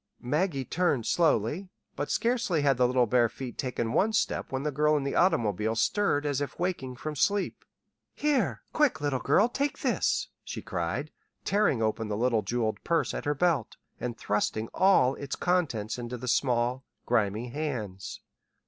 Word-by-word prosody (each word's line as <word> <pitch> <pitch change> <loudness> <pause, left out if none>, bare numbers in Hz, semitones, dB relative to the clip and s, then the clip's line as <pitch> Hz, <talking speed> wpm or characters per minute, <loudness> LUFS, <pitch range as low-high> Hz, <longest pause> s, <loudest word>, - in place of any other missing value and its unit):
Maggie 145 +1 0
turned 155 -9 0
slowly; 160 - +1 0.3
but 145 - -3
scarcely 230 - +1
had 140 -3 +3
the 125 0 +4
little 125 0 +3
bare 120 +1 +3
feet 125 0 -7
taken 120 -3 -2
one 220 +3 +2
step - - 0
when 135 0 -2
the 150 - -1
girl 150 +2 +3
in 140 - -2
the 140 - -2
automobile 110 - +2
stirred 145 - +1
as 145 -1 0
if 145 - -4
waking 170 -8 -2
from 155 +4 -5
sleep. 200 +7 0 0.5
"Here 240 - 0
quick 295 - +2
little 145 -3 0
girl, 210 - +4
take 275 +3 -2
this," 240 -8 +1
she - - -6
cried, 85 - -3 0.3
tearing 195 - +2
open 110 0 -1
the 105 -1 -2
little 115 -1 +2
jeweled 110 +2 -2
purse 165 -1 +1
at - - -4
her 145 0 +1
belt, 160 -7 +1 0.2
and 120 -2 -4
thrusting 110 +2 -1
all 185 -9 +4
its 140 0 -5
contents 145 - 0
into 120 +1 -5
the 125 +2 -7
small, 125 0 +1 0.2
grimy 110 0 0
hands. 115 -9 -4
135 Hz, 165 wpm, -28 LUFS, 115-170 Hz, 0.5 s, the